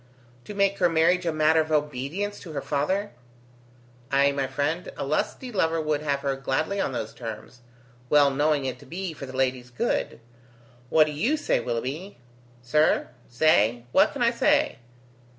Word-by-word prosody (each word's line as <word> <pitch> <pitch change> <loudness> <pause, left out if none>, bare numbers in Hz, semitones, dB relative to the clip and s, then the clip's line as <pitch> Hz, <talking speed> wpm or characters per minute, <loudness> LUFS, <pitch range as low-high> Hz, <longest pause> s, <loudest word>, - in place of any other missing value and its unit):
"To 210 - -8
make 200 0 +1
her 175 -2 +4
marriage 170 +2 +2
a - - +2
matter 155 +1 +3
of 155 0 -5
obedience 150 +7 -2
to 165 -5 -10
her 140 - -3
father?" 190 +9 -1 1.0
"Ay, 140 +1 +4
my 140 -1 -1
friend, 150 +6 -2
a - - -3
lusty 200 - -2
lover 165 -6 +1
would 155 -1 -1
have 140 -2 -1
her 140 -1 -1
gladly 145 +9 -1
on - - -1
those 110 -3 -4
terms, 115 +1 -8 0.5
well 145 -1 +5
knowing 145 0 +1
it 130 -1 -4
to - - -15
be 180 0 -5
for 140 -2 -8
the 130 0 -8
lady's 130 -2 0
good. 120 - -2 0.7
What 155 -1 +5
do 150 - -4
you 240 - +1
say, - - +1
Willoughby?" 130 - -4 0.5
"Sir! 150 +6 +2 0.2
Say? 120 -3 +3
What - - +4
can - - -1
I - - +4
say? - - +2
150 Hz, 170 wpm, -25 LUFS, 135-165 Hz, 1.0 s, well